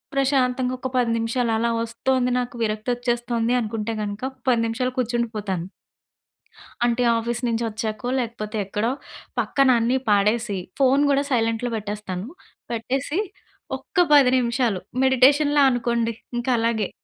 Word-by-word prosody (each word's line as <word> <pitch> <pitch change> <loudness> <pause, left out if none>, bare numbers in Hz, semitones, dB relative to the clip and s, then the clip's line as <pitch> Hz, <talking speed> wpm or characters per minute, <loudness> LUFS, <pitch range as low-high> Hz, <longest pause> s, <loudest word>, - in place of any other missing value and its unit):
ప్రశాంతంగా 260 -2 +1
ఒక్క 260 - -3
10 240 -2 +2
నిమిషాలలా 230 0 0
వస్తోంది, 250 +2 0
నాకు 245 -1 -4
విరక్తొచ్చేస్తోంది 240 +2 -1
అనుకుంటే 225 0 -3
గనుక, 205 +3 -5
ఒక 260 - -28
10 235 -2 +3
నిమిషాలు 250 +2 -2
కూర్చుండిపోతాను. 220 -7 -2 1.2
అంటే 240 +1 +1
ఆఫీస్ 235 +1 -2
నుంచి 230 0 0
వచ్చాకో, 220 +2 -4
లేకపోతే 220 -3 -4
ఎక్కడో, 210 +4 -1 0.5
పక్కన 275 -1 +2
అన్నీ 240 +3 +2
పాడేసి, 210 +1 +2 0.2
ఫోన్ 270 +1 +4
గూడా 280 0 +3
సైలెంట్‌లో 230 0 0
పెట్టేస్తాను. 205 -2 -5 0.4
పెట్టేసి, 265 - -2 0.6
ఒక్క - - -14 0.2
10 280 -4 +7
నిమిషాలు 235 -5 0 0.2
మెడిటేషన్‌లా 285 +3 +4
అనుకోండి, 235 -1 0 0.2
ఇంకలాగే... 230 -4 0
235 Hz, 115 wpm, -23 LUFS, 225-255 Hz, 1.2 s, 10